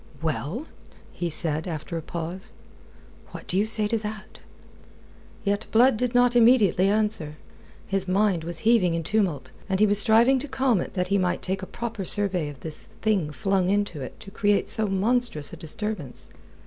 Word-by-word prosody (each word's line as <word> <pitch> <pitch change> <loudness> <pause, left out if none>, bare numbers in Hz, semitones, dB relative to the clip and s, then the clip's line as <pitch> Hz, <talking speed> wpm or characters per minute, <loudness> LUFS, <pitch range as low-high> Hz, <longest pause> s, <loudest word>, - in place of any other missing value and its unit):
"Well?" 160 - -3 0.5
he 175 - -3
said 160 +1 +3
alter 165 0 -5
a 165 - -3
pause. 170 +4 -6 0.7
"What - - -10
do - - -3
you 205 +3 +2
say 215 -1 +1
to 225 +1 0
that?" 210 0 -8 1.0
Yet 205 +1 -1
Blood 245 +2 +5
did 245 +2 -2
not 245 0 +4
immediately 225 -6 +5
answer. 210 -8 -1 0.5
His 195 -1 -2
mind 190 -2 +1
was 170 0 -5
heaving 210 -7 +4
in 165 - -2
tumult, 190 -7 -1 0.2
and 190 0 0
he 215 - +6
was 205 -1 +3
striving 230 +5 +4
to 290 - -2
calm 260 -7 +1
it - - -7
that 180 -1 -1
he 200 0 +2
might 180 -1 -1
take 190 +1 -2
a 190 - -6
proper 230 0 -5
survey 185 -5 +1
of 140 -3 -12
this 155 -1 -1
thing 195 -9 -1
flung 195 +1 0
into 205 -6 -1
it 130 - -8
to 195 - -11
create 205 0 +1
so 220 -1 +2
monstrous 195 - 0
a - - -5
disturbance. 165 - -4
195 Hz, 180 wpm, -25 LUFS, 170-220 Hz, 1.0 s, he